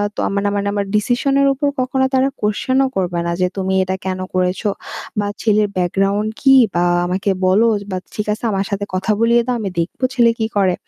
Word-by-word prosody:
তো - - -6
ইয়া - - +1
মানে 200 0 +1
মানে 200 0 -1
আমার 200 -1 -1
decision 245 +6 +1
এর 275 - +4
উপর 285 +2 -1
কখনো 265 +1 +1
তারা 260 +1 +3
question 215 +5 0
ও - - +1
করবে 175 -2 -1
না 170 - -1
যে 180 - +3
"তুমি 190 0 -1
এটা 185 0 -2
কেন 185 0 -2
করেছ 180 0 0 0.6
বা 205 - 0
ছেলের 210 -1 +2
background 195 +4 0
কি? 270 -1 +6 0.2
বা 175 0 +1 0.2
আমাকে 185 +3 -1 0.2
বলো 200 +5 +4 0.3
বা 185 - -2 0.2
ঠিক 210 - -2
আছে 215 - -9
আমার 195 0 -1
সাথে 200 0 -2
কথা 190 +3 0
বলিয়ে 235 +1 +4
দাও 250 -1 -1
আমি 200 -3 -3
দেখব 165 - -3
ছেলে 240 -3 +4
কি 220 - +1
করে।" 190 -2 +3
205 Hz, 215 wpm, -18 LUFS, 185-235 Hz, 0.6 s, কি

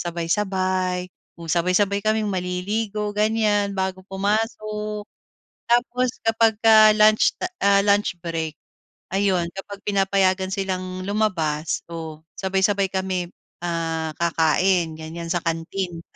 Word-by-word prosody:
sabay-sabay. 185 +1 -1 0.3
Kung 170 -1 -10
sabay-sabay 185 +4 +2
kaming 215 0 +1
maliligo, 205 +4 -2
ganiyan, 210 -1 +1
bago 190 0 -2
pumasok. 210 +1 -2 0.6
Tapos, 245 +1 +2 0.2
'kapagka 220 -1 +5
lunch 215 0 +5
ta 365 - -1
ah, 200 0 +5
lunch 205 -2 +2
break 165 -2 -3 0.6
ayun 190 -4 +1
kapag 200 +1 -8
pinapayagan 195 -1 +1
silang 185 -2 -3
lumabas 165 -7 0
o 160 -2 -7 0.2
sabay-sabay 195 +1 +1
kami, 185 -2 -2 0.4
ah, 165 -2 -2
kakain 170 +1 +2
ganiyan 165 +1 -7
sa 175 - 0
canteen. 165 +1 -3
190 Hz, 105 wpm, -23 LUFS, 175-210 Hz, 0.6 s, kapagka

